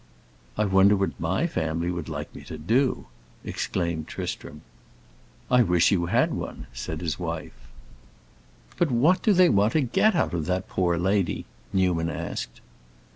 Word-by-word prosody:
"I 105 Hz, -, +2 dB
wonder 95 Hz, +1 st, +5 dB
what 95 Hz, -1 st, -2 dB
my 90 Hz, -, 0 dB
family 85 Hz, -, -1 dB
would 85 Hz, -2 st, -5 dB
like 75 Hz, -1 st, -6 dB
me -, -, -10 dB
to 80 Hz, -, -7 dB
do!" 120 Hz, -, +1 dB, 0.4 s
exclaimed 85 Hz, -3 st, -2 dB
Tristram. 75 Hz, -, -6 dB, 0.9 s
"I 125 Hz, 0 st, +6 dB
wish 90 Hz, -6 st, +3 dB
you 85 Hz, -4 st, +1 dB
had -, -, +2 dB
one!" -, -, -6 dB
said 80 Hz, +6 st, -5 dB
his 80 Hz, -2 st, -3 dB
wife. 85 Hz, -2 st, -4 dB, 1.2 s
"But 175 Hz, -, +2 dB
what 145 Hz, +10 st, +3 dB
do 215 Hz, -, +3 dB
they 185 Hz, -2 st, +6 dB
want 105 Hz, -4 st, +3 dB
to 155 Hz, -, +3 dB
get 180 Hz, -, +2 dB
out 165 Hz, -, +1 dB
of 85 Hz, -2 st, -2 dB
that 95 Hz, +1 st, -1 dB
poor 90 Hz, -2 st, 0 dB
lady?" 95 Hz, +1 st, 0 dB, 0.3 s
Newman 90 Hz, -3 st, +1 dB
asked. -, -, -5 dB
90 Hz, 155 wpm, -25 LUFS, 80-110 Hz, 1.2 s, I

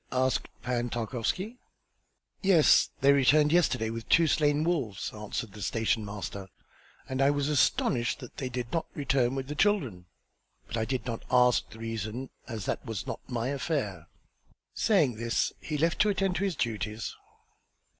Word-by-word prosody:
asked 130 Hz, 0 st, +1 dB, 0.2 s
Pan 120 Hz, 0 st, -1 dB
Tarkowski. 125 Hz, -, -3 dB, 0.8 s
"Yes. 185 Hz, -6 st, +5 dB
They 140 Hz, +1 st, +6 dB
returned 145 Hz, +2 st, +4 dB
yesterday 130 Hz, -10 st, +2 dB
with 115 Hz, 0 st, -7 dB
two 165 Hz, -, +6 dB
slain 150 Hz, -1 st, +2 dB
wolves," 145 Hz, -, -1 dB
answered 105 Hz, 0 st, -5 dB
the 105 Hz, +1 st, -11 dB
station 110 Hz, +1 st, 0 dB
master; 100 Hz, -1 st, -6 dB, 0.6 s
"and 130 Hz, 0 st, -2 dB
I 135 Hz, -, +5 dB
was 145 Hz, -1 st, 0 dB
astonished 125 Hz, -4 st, +2 dB
that 125 Hz, -4 st, -11 dB
they 130 Hz, -, -3 dB
did 125 Hz, -1 st, -4 dB
not 165 Hz, -, -1 dB
return 135 Hz, -3 st, +1 dB
with 135 Hz, -1 st, -3 dB
the 150 Hz, -, -4 dB
children. 145 Hz, -, +1 dB, 0.6 s
But -, -, -6 dB
I 110 Hz, -, 0 dB
did 130 Hz, -1 st, -2 dB
not 115 Hz, -3 st, -4 dB
ask 125 Hz, -1 st, +4 dB
the 110 Hz, -, -12 dB
reason 115 Hz, +3 st, -4 dB, 0.2 s
as 110 Hz, -5 st, -5 dB
that -, -, -2 dB
was 110 Hz, -6 st, -5 dB
not -, -, -4 dB
my 120 Hz, 0 st, -1 dB
affair." 135 Hz, -, -2 dB, 0.7 s
Saying 155 Hz, -, +2 dB
this 115 Hz, +1 st, 0 dB
he 155 Hz, -, -4 dB
left 165 Hz, +3 st, +1 dB
to 210 Hz, -, +4 dB
attend 195 Hz, -2 st, 0 dB
to 200 Hz, -, 0 dB
his 190 Hz, -4 st, -1 dB
duties. 110 Hz, -2 st, -3 dB
125 Hz, 165 wpm, -29 LUFS, 115-150 Hz, 0.8 s, They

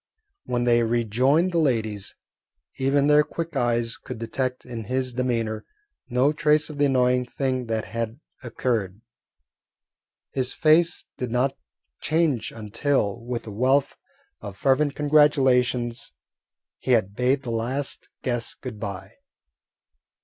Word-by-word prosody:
When 120 Hz, 0 st, -1 dB
they 120 Hz, -1 st, +4 dB
rejoined 120 Hz, -, +2 dB
the 170 Hz, -, +1 dB
ladies, 110 Hz, -9 st, 0 dB, 0.6 s
even 135 Hz, +1 st, +2 dB
their 150 Hz, 0 st, +6 dB
quick 165 Hz, +1 st, -5 dB
eyes 120 Hz, -2 st, +1 dB
could -, -, -8 dB
detect 125 Hz, +3 st, -3 dB
in 115 Hz, -3 st, -6 dB
his 130 Hz, +2 st, -1 dB
demeanour 115 Hz, -3 st, -1 dB, 0.5 s
no 130 Hz, +4 st, +3 dB
trace 150 Hz, 0 st, +2 dB
of 145 Hz, -, -9 dB
the 145 Hz, -, +4 dB
annoying 125 Hz, -2 st, +3 dB
thing 130 Hz, 0 st, -2 dB
that 110 Hz, -1 st, -1 dB
had 115 Hz, +2 st, -4 dB, 0.2 s
occurred. 115 Hz, -5 st, -2 dB, 1.3 s
His 130 Hz, -1 st, -2 dB
face 165 Hz, +2 st, +3 dB
did 125 Hz, -, -3 dB
not 130 Hz, +3 st, +1 dB, 0.4 s
change 155 Hz, -7 st, 0 dB
until, 110 Hz, 0 st, -1 dB
with 120 Hz, 0 st, -4 dB
a 110 Hz, -, -7 dB
wealth 130 Hz, +6 st, +2 dB, 0.4 s
of 100 Hz, -2 st, -8 dB
fervent 140 Hz, +2 st, +2 dB
congratulations, 130 Hz, -5 st, +3 dB, 0.7 s
he 130 Hz, -, +1 dB
had 100 Hz, -4 st, +2 dB
bade 130 Hz, +3 st, +1 dB
the 120 Hz, -, -4 dB
last 125 Hz, +5 st, -2 dB
guest 120 Hz, -3 st, -2 dB
good 120 Hz, -5 st, -7 dB
bye. 100 Hz, -4 st, -6 dB
125 Hz, 130 wpm, -24 LUFS, 115-140 Hz, 1.3 s, their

